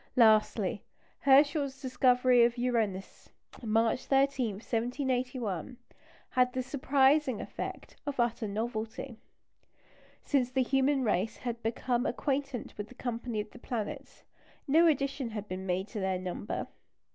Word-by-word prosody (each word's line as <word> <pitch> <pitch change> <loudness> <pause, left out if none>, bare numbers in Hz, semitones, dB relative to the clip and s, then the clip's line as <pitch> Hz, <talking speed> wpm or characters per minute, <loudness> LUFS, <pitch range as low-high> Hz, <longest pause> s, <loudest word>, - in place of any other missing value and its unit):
Lastly, 215 -4 +4 0.4
Herschel's 280 0 +4
discovery 250 -2 +4
of 235 +1 +2
Uranus, 225 -6 -2 0.3
March 225 +2 +1
13, 270 -4 +2
1781, 245 - -2 0.5
had 250 0 +3
the 255 - -1
surprising 270 -1 +2
effect - - -7
of 280 -2 -3
utter 235 -2 0
novelty. 220 +3 -4 1.0
Since 260 -4 +1
the 260 0 +1
human 270 +1 +2
race 210 -1 0
had 235 -2 -5
become 240 +3 -1
acquainted 275 -3 -2
with 205 - -4
the 250 - -15
company 235 -2 -3
of 210 - -10
the 250 - -13
planets, 260 +4 -5 0.4
no 325 +5 +5
addition 275 -4 0
had 210 -2 -6
been 185 0 -5
made 185 +2 -1
to 220 - -5
their 190 -1 0
number. 185 +2 -4
245 Hz, 125 wpm, -30 LUFS, 220-270 Hz, 1.0 s, no